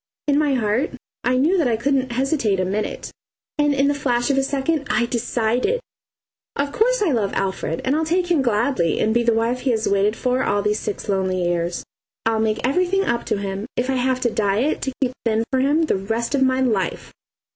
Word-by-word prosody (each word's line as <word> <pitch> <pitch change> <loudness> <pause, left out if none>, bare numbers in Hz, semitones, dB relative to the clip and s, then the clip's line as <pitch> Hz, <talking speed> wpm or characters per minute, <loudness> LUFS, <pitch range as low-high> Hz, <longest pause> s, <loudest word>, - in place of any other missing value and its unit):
In 290 0 +3
my 295 -3 +2
heart 230 +4 0 0.3
I 250 +1 +2
knew 330 +8 +3
that 310 - +2
I 230 -2 +1
couldn't 265 0 0
hesitate 255 -6 +1
a 185 - +1
minute 205 +3 -3 0.5
and 295 0 +3
in 275 0 +2
the 285 - +2
flash 255 -2 0
of 275 - 0
a - - +3
second 280 +2 -1
I 240 - +2
decided. 240 - 0 0.8
Of 280 0 -1
course - - +2
I 350 - +2
love 220 -6 0
Alfred, 190 -4 -2
and 265 +2 +2
I'll 315 - +1
take 350 +2 0
him 320 -5 +3
gladly 235 - +1
and 220 - +2
be 240 - +3
the 235 0 +2
wife 230 +2 0
he 255 - -1
has 220 -3 +1
waited 200 +2 +2
for 255 +1 0
all 205 0 +1
these 210 0 +1
six 210 - -5
lonely 190 -2 0
years. 175 0 -1 0.4
I'll 225 -1 +1
make 220 +2 0
everything 365 +6 +1
up 235 0 -1
to - - 0
him, 200 +1 -4
if 250 +2 0
I - - 0
have 255 0 +1
to 240 - +1
diet 215 +8 0
to 265 - -2
keep 250 - 0
thin 225 -1 +1
for 260 - +2
him 290 +5 +2
the 310 - +1
rest 225 +6 -2
of 280 - +1
my 260 0 +3
life. 215 -9 -1
245 Hz, 220 wpm, -21 LUFS, 215-280 Hz, 0.8 s, In